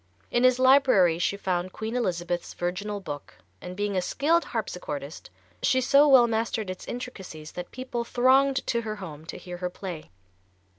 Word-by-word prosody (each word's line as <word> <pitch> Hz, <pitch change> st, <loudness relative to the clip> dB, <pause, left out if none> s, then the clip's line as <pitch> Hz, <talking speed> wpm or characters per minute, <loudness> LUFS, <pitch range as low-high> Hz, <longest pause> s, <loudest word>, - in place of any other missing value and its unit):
In 240 Hz, -, +2 dB
his 255 Hz, -1 st, +5 dB
library 255 Hz, -11 st, +5 dB
she 200 Hz, +3 st, 0 dB
found 185 Hz, -2 st, -2 dB
Queen 220 Hz, +2 st, -4 dB
Elizabeth's 175 Hz, -6 st, -2 dB
Virginal 195 Hz, +4 st, -3 dB
Book, 145 Hz, -7 st, -8 dB, 0.3 s
and 180 Hz, -, -7 dB
being 205 Hz, -1 st, -1 dB
a 185 Hz, -, +2 dB
skilled 320 Hz, -, +1 dB
harpsichordist, 160 Hz, -9 st, -5 dB, 0.3 s
she 260 Hz, -, +3 dB
so 280 Hz, +3 st, +5 dB
well 260 Hz, -4 st, +7 dB
mastered 225 Hz, -3 st, -1 dB
its 185 Hz, -, -9 dB
intricacies 190 Hz, -11 st, -7 dB
that 180 Hz, -, -7 dB
people 255 Hz, -2 st, -4 dB
thronged 265 Hz, +3 st, +3 dB
to 235 Hz, -, 0 dB
her 215 Hz, -2 st, -4 dB
home 160 Hz, -6 st, -9 dB
to -, -, -6 dB
hear 180 Hz, -1 st, -8 dB
her 180 Hz, 0 st, -3 dB
play. 180 Hz, -3 st, -7 dB
205 Hz, 165 wpm, -26 LUFS, 180-250 Hz, 0.3 s, well